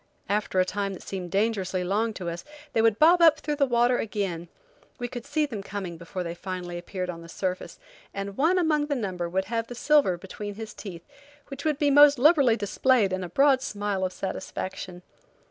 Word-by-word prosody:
After 205 Hz, -2 st, 0 dB
a 185 Hz, -, +4 dB
time 200 Hz, +1 st, -2 dB
that 185 Hz, -, -10 dB
seemed 185 Hz, -2 st, -5 dB
dangerously 195 Hz, -2 st, 0 dB
long 210 Hz, +5 st, 0 dB
to 180 Hz, -, -6 dB
us, 170 Hz, 0 st, -4 dB, 0.3 s
they 225 Hz, -, +3 dB
would 225 Hz, -2 st, +3 dB
bob 340 Hz, +5 st, +6 dB
up 320 Hz, -2 st, +7 dB
through 295 Hz, -1 st, -3 dB
the 280 Hz, -1 st, +3 dB
water 240 Hz, 0 st, +3 dB
again. 195 Hz, -6 st, -3 dB, 0.5 s
We 245 Hz, -, -3 dB
could 245 Hz, +1 st, -8 dB
see 300 Hz, +1 st, +1 dB
them 225 Hz, -8 st, -6 dB
coming 195 Hz, -3 st, -6 dB
before 170 Hz, +2 st, -6 dB
they 170 Hz, -1 st, -4 dB
finally 175 Hz, -1 st, -6 dB
appeared 185 Hz, +1 st, -5 dB
on 170 Hz, -1 st, -10 dB
the 165 Hz, -, -12 dB
surface, 185 Hz, +1 st, -4 dB, 0.3 s
and 195 Hz, 0 st, -5 dB
one 325 Hz, -, +3 dB
among 305 Hz, -4 st, +2 dB
the 290 Hz, -, -1 dB
number 185 Hz, -7 st, -3 dB
would 190 Hz, +2 st, -1 dB
have 230 Hz, +2 st, -2 dB
the 245 Hz, -, -8 dB
silver 285 Hz, -9 st, +3 dB
between 200 Hz, +3 st, -7 dB
his 220 Hz, 0 st, -7 dB
teeth, 175 Hz, -5 st, -9 dB, 0.4 s
which 275 Hz, +1 st, -8 dB
would 305 Hz, -3 st, +1 dB
be 290 Hz, -1 st, +2 dB
most 290 Hz, 0 st, +7 dB
liberally 275 Hz, -3 st, +5 dB
displayed 210 Hz, 0 st, +2 dB
in 185 Hz, 0 st, -2 dB
a 180 Hz, -, -6 dB
broad 275 Hz, -, +4 dB
smile 205 Hz, -4 st, -2 dB
of 185 Hz, -, -1 dB
satisfaction. 185 Hz, -1 st, -6 dB
205 Hz, 205 wpm, -26 LUFS, 185-265 Hz, 0.5 s, up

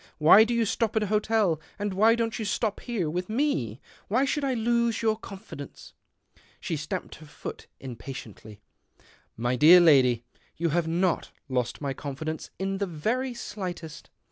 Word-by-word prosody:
Why 165 Hz, +7 st, +8 dB
do 235 Hz, -, -3 dB
you 230 Hz, -1 st, +2 dB
stop 225 Hz, +1 st, -1 dB
at 220 Hz, -, +2 dB
a 210 Hz, 0 st, -2 dB
hotel, 210 Hz, -6 st, +2 dB, 0.2 s
and 205 Hz, -1 st, -2 dB
why 220 Hz, +4 st, +5 dB
don't 230 Hz, 0 st, -2 dB
you -, -, -2 dB
stop 210 Hz, +1 st, -1 dB
here 225 Hz, -9 st, -2 dB
with 180 Hz, +5 st, -3 dB
me? 215 Hz, -, -1 dB, 0.3 s
Why 250 Hz, +7 st, +2 dB
should 285 Hz, +1 st, -1 dB
I 265 Hz, -2 st, 0 dB
lose 235 Hz, 0 st, +1 dB
your 220 Hz, -1 st, +3 dB
confidence? 195 Hz, -9 st, -10 dB, 0.3 s
" -, -, -48 dB, 0.3 s
She 165 Hz, -, -3 dB
stamped 150 Hz, 0 st, -5 dB
her 155 Hz, -, -14 dB
foot 150 Hz, -, -8 dB
impatiently. 115 Hz, -4 st, -9 dB, 0.4 s
" -, -, -30 dB
My 125 Hz, -, +2 dB
dear 160 Hz, +8 st, +8 dB
lady, 130 Hz, -8 st, +5 dB, 0.3 s
you 170 Hz, +1 st, 0 dB
have 165 Hz, +1 st, 0 dB
not 175 Hz, +1 st, 0 dB, 0.2 s
lost 125 Hz, -1 st, -2 dB
my 140 Hz, -2 st, -2 dB
confidence 150 Hz, +3 st, -5 dB
in 195 Hz, 0 st, -2 dB
the 200 Hz, -, -1 dB
very 235 Hz, +10 st, -2 dB
slightest. 180 Hz, -9 st, -7 dB
185 Hz, 170 wpm, -27 LUFS, 150-225 Hz, 0.4 s, Why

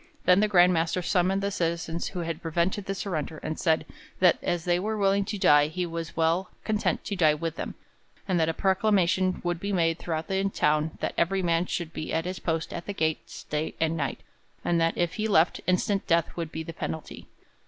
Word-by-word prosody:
Then 180 Hz, +1 st, +6 dB
the 215 Hz, -, +3 dB
Grand 180 Hz, -3 st, +5 dB
Master 165 Hz, +2 st, 0 dB
summoned 185 Hz, +3 st, +1 dB
the 200 Hz, -, 0 dB
citizens 170 Hz, -1 st, -2 dB
who 180 Hz, -, -4 dB
had 165 Hz, 0 st, -4 dB
prevented 175 Hz, +4 st, -1 dB
the 195 Hz, -, -2 dB
surrender, 160 Hz, -5 st, -3 dB
and 155 Hz, 0 st, -4 dB
said 160 Hz, -2 st, +2 dB, 0.3 s
that 180 Hz, -2 st, +5 dB
as 175 Hz, -2 st, -1 dB
they 175 Hz, 0 st, +2 dB
were 215 Hz, +3 st, -2 dB
willing 200 Hz, 0 st, +2 dB
to 210 Hz, 0 st, -3 dB
die 145 Hz, -5 st, +5 dB
he 180 Hz, +3 st, -3 dB
was 165 Hz, -1 st, -6 dB
well 165 Hz, +3 st, +1 dB
content 215 Hz, -1 st, 0 dB
to 205 Hz, -, -2 dB
die 155 Hz, -5 st, +4 dB
with 165 Hz, +1 st, -3 dB
them, -, -, -5 dB, 0.5 s
and 185 Hz, -3 st, +1 dB
that 160 Hz, 0 st, +2 dB
a -, -, 0 dB
proclamation 190 Hz, -2 st, +2 dB
would 175 Hz, -1 st, -1 dB
be 200 Hz, +3 st, -3 dB
made 165 Hz, -3 st, +1 dB
throughout 160 Hz, -1 st, -3 dB
the 190 Hz, 0 st, 0 dB
town 155 Hz, -3 st, +1 dB
that -, -, -1 dB
every 190 Hz, +3 st, +1 dB
man 170 Hz, 0 st, +1 dB
should 165 Hz, -2 st, -3 dB
be 155 Hz, -, -5 dB
at 165 Hz, +1 st, 0 dB
his 185 Hz, +1 st, -4 dB
post 165 Hz, -1 st, -2 dB
at 170 Hz, -, -6 dB
the 205 Hz, -, -3 dB
gates 160 Hz, -4 st, -2 dB
day 150 Hz, +1 st, -3 dB
and 160 Hz, 0 st, +1 dB
night, 140 Hz, -4 st, -3 dB, 0.4 s
and 170 Hz, -1 st, +2 dB
that, 165 Hz, 0 st, +1 dB
if 175 Hz, 0 st, 0 dB
he 215 Hz, 0 st, 0 dB
left, 175 Hz, -5 st, +3 dB
instant 195 Hz, +2 st, +1 dB
death 170 Hz, -2 st, +2 dB
would 165 Hz, -2 st, -4 dB
be 160 Hz, -, -4 dB
the 165 Hz, -, -7 dB
penalty. 160 Hz, -1 st, -6 dB
170 Hz, 215 wpm, -27 LUFS, 165-190 Hz, 0.5 s, Then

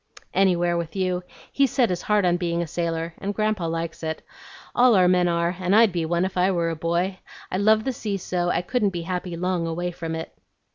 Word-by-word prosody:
"Anywhere 175 Hz, -3 st, +2 dB
with 170 Hz, +1 st, -4 dB
you. 185 Hz, -2 st, 0 dB, 0.3 s
He's 275 Hz, -1 st, +3 dB
set 245 Hz, -4 st, +2 dB
his 180 Hz, -, -2 dB
heart 210 Hz, -2 st, +2 dB
on 175 Hz, 0 st, +3 dB
being 170 Hz, -1 st, -1 dB
a -, -, -4 dB
sailor, 165 Hz, 0 st, -3 dB
and 200 Hz, +1 st, -3 dB
Grandpa 215 Hz, -5 st, 0 dB
likes 165 Hz, 0 st, -4 dB
it. 160 Hz, -1 st, -4 dB, 0.5 s
All 245 Hz, -2 st, +5 dB
our 185 Hz, -2 st, +5 dB
men 180 Hz, -1 st, +3 dB
are, 170 Hz, +1 st, 0 dB
and 185 Hz, +2 st, +2 dB
I'd 225 Hz, -2 st, +6 dB
be 170 Hz, -2 st, -2 dB
one 170 Hz, +2 st, +1 dB
if 190 Hz, 0 st, -4 dB
I 180 Hz, +1 st, +3 dB
were 170 Hz, -3 st, 0 dB
a -, -, -3 dB
boy. 170 Hz, +4 st, -1 dB, 0.3 s
I -, -, 0 dB
love 215 Hz, +2 st, +4 dB
the 265 Hz, -, -1 dB
sea 210 Hz, -4 st, -3 dB
so, 175 Hz, -1 st, -2 dB
I 175 Hz, -, 0 dB
couldn't 215 Hz, +1 st, +1 dB
be 175 Hz, -3 st, -5 dB
happy 180 Hz, 0 st, -4 dB
long 180 Hz, -1 st, -1 dB
away 175 Hz, +2 st, -2 dB
from 165 Hz, -1 st, -5 dB
it." 160 Hz, -, -6 dB
180 Hz, 230 wpm, -24 LUFS, 170-195 Hz, 0.5 s, I'd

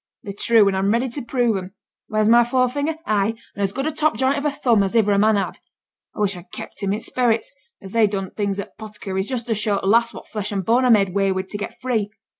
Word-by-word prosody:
They're 200 Hz, -, -6 dB
true, 220 Hz, +1 st, +4 dB
and 195 Hz, -, +1 dB
I'm 190 Hz, +1 st, +1 dB
ready 240 Hz, +3 st, +1 dB
to 280 Hz, +4 st, -5 dB
prove 240 Hz, -3 st, 0 dB
'em. 185 Hz, +1 st, -8 dB, 0.3 s
Where's 215 Hz, 0 st, +1 dB
my 235 Hz, +1 st, +6 dB
forefinger? 260 Hz, +5 st, 0 dB
Ay! 215 Hz, +1 st, +1 dB, 0.2 s
and 200 Hz, -, -6 dB
as 195 Hz, -1 st, +1 dB
good 270 Hz, +6 st, -3 dB
a 315 Hz, -, 0 dB
top 310 Hz, -5 st, +1 dB
joint 265 Hz, +3 st, +2 dB
of 285 Hz, +1 st, -3 dB
a -, -, +3 dB
thumb 250 Hz, -7 st, +2 dB
as 195 Hz, +3 st, -1 dB
iver 215 Hz, -3 st, +4 dB
a 200 Hz, -, +3 dB
man 215 Hz, +1 st, +4 dB
had? 200 Hz, -, -2 dB, 0.6 s
I -, -, -4 dB
wish 200 Hz, -2 st, +2 dB
I'd 175 Hz, 0 st, -12 dB
kept -, -, -9 dB
'em 195 Hz, -1 st, 0 dB
i' -, -, -1 dB
sperits, 250 Hz, -, 0 dB, 0.3 s
as 190 Hz, -, -9 dB
they 225 Hz, -1 st, +4 dB
done 195 Hz, -2 st, -4 dB
things 200 Hz, -2 st, -2 dB
at 200 Hz, -, -5 dB
t' -, -, -8 dB
'potticary's, 200 Hz, -2 st, -4 dB
just 245 Hz, -3 st, -2 dB
to 235 Hz, -, 0 dB
show 210 Hz, -1 st, 0 dB
t' -, -, -6 dB
lass 230 Hz, +3 st, +3 dB
what -, -, -11 dB
flesh 210 Hz, -1 st, -4 dB
and 195 Hz, -3 st, -2 dB
bone 245 Hz, +3 st, +3 dB
I -, -, +3 dB
made 205 Hz, -4 st, +5 dB
away 195 Hz, +1 st, +1 dB
wi' 190 Hz, 0 st, -1 dB
to 205 Hz, -, -9 dB
get 205 Hz, 0 st, -5 dB
free. 225 Hz, -5 st, -1 dB
215 Hz, 270 wpm, -21 LUFS, 200-240 Hz, 0.6 s, my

